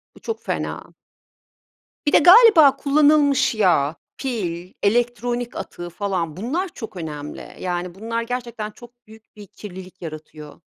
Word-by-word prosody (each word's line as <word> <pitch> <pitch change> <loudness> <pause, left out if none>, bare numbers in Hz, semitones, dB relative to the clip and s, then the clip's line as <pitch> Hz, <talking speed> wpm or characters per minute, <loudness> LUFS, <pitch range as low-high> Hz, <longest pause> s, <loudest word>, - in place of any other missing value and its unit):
Bu - - -15
çok 455 - -5
fena. - - -4 1.1
Bir 290 - +1
de, - - +8
galiba, 350 - +8
kullanılmış 285 -3 +3
yağ, 170 -7 +2 0.2
pil, 185 -9 -4
elektronik 240 +2 0
atığı 175 0 -7
falan, 175 -3 -3
bunlar 315 - -2
çok 225 - -9
önemli, 150 -3 -7
yani, 180 -1 -3
bunlar 230 +3 -3
gerçekten 235 -3 -5
çok 240 +1 -17
büyük 220 0 -18
bir 205 -1 -12
kirlilik 185 -1 -11
yaratıyor. 155 -1 -10
220 Hz, 130 wpm, -22 LUFS, 175-250 Hz, 1.1 s, de